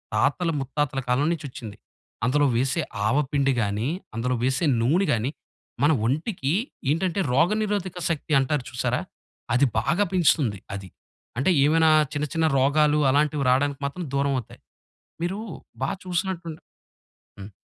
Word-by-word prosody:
తాతల 140 +10 +1
ముత్తాతల 135 0 -2
కాలం 125 +4 +2
నుంచొచ్చింది. 130 -9 -8 0.5
అందులో 145 +3 +3
వేసే 130 +2 +1 0.3
ఆవపిండి 140 +2 +1
గాని, 105 +4 -1 0.3
అందులో 125 +3 0
వేసే 130 +6 +1 0.2
నూనె 170 +11 +2
గాని, 120 +4 -1 0.5
మన 145 - +5
ఒంటికి 145 - -1 0.4
ఏంటంటే 170 +5 0
రోగనిరోధక 190 +4 +1
శక్తి 160 -1 -2
అంటారు 135 +1 0
చూసారా? 125 0 -1 0.5
అది 125 +3 +4
బాగా 170 - +1
పెంచుతుంది 150 - +2
అది. 95 -1 -6 0.5
అంటే 135 +8 +1
ఏమైనా 160 +2 +4 0.2
చిన్న 150 0 -1
చిన్న 165 -1 +1
రోగాలు 150 +3 +3
అలాంటివి 145 +1 +2
రాడానికి 140 +2 +2
మాత్రం 160 +6 -4
దూరమవుతయి. 140 -4 -1 0.6
మీరు 180 +4 -2 0.4
బా - - 0
చూసినట్టుండే 175 -3 -3 0.8
హ్మ్. 100 +1 -8
145 Hz, 120 wpm, -25 LUFS, 130-165 Hz, 0.8 s, మన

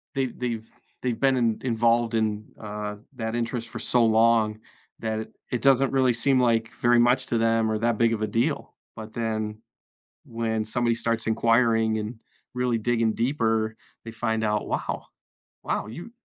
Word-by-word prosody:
they 135 -1 +1
they've 120 -3 -4 0.4
they've 120 -3 -1
been 135 -1 +3
in 115 -3 +1
involved 115 -1 +2
in, 110 -1 0
uh, 105 -1 -5 0.2
that 110 -1 -3
interest 120 0 -2
for - - -7
so 120 -1 +3
long 110 -1 +3 0.4
that 110 0 -3 0.2
it 125 - -1
doesn't 135 -1 +4
really 130 -2 +3
seem 130 +3 +3
like, 115 -2 +2
very 120 0 +5
much 125 +2 +3
to 115 - 0
them 115 0 +2
or 110 - 0
that 115 0 0
big 115 -1 +3
of 110 - -3
a - - 0
deal. 115 +2 -1 0.2
But 110 0 -9
then, 110 -2 -3 0.6
when 115 -1 -2
somebody 120 +2 +1
starts 115 0 0
inquiring 115 -1 +3
and 110 +2 -5 0.3
really 125 -2 0
digging 115 0 +1
deeper, 115 -3 0 0.3
they 115 - -6
find 110 0 -1
out, 105 -1 0
"Wow, - - -3 0.6
wow, - - -2
you 170 - -9
115 Hz, 165 wpm, -25 LUFS, 110-120 Hz, 0.6 s, very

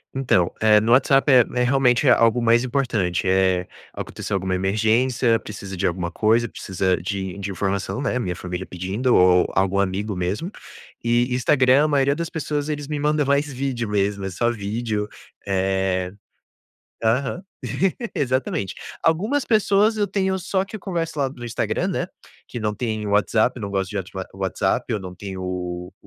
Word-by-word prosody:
Então, 120 -10 +2
eh, 110 -1 +6
no 110 +2 0
WhatsApp 135 +2 +4
é 125 -2 +7 0.2
é - - +4
realmente 125 +1 +3
algo 115 0 +4
mais 115 +1 +4
importante, 120 -9 0
eh, 95 -1 +2 0.3
aconteceu 100 - -5
alguma 95 -1 -1
emergência, 115 +5 +2
precisa 100 -2 -8
de 90 - -2
alguma 85 -1 -2
coisa, 115 +5 +2
precisa 95 -3 -1
de 95 -1 -4
de 100 0 -4
informação, 100 +6 -2
né, 125 -2 0
minha 90 -7 -2
família 90 +1 -5
pedindo 95 +9 -1
ou 90 0 +5
algum 95 +1 +2
amigo 100 +2 -1
mesmo, 95 - -2 0.5
e 120 +1 +2
Instagram, 130 +2 +4
a - - +2
maioria 140 -1 +2
das 170 +1 -3
pessoas, 150 -2 -3
eles 145 -2 -3
me 150 0 -3
mandam 150 0 +1
mais 140 +1 +1
vídeo 125 -4 -3
mesmo, 100 -1 0
é - - -2
só 120 +6 0
vídeo, 105 0 -3 0.4
eh 95 -1 0 0.9
aham 130 +9 0 0.7
exatamente. 130 -8 -1 0.3
Algumas 210 - +1
pessoas 215 0 +3
eu 205 - +2
tenho 190 -1 0
só 190 +1 -1
que 195 - -14
eu - - -11
converso 165 -4 -3
lá 140 -1 +1
no 125 -2 -10
Instagram, 120 - -1
né, - - -1 0.4
que - - -6
não 105 -1 -1
tem 110 -2 -3
WhatsApp, 110 +4 +2
não 100 -2 -4
gosto 95 -2 -1
de 105 - -3
ati 95 -1 -6 0.2
o - - -13
WhatsApp, 100 +5 -1
ou 105 - -2
não 90 -1 -8
tem 95 +1 -7
o 90 -1 -4
110 Hz, 170 wpm, -22 LUFS, 95-135 Hz, 0.9 s, é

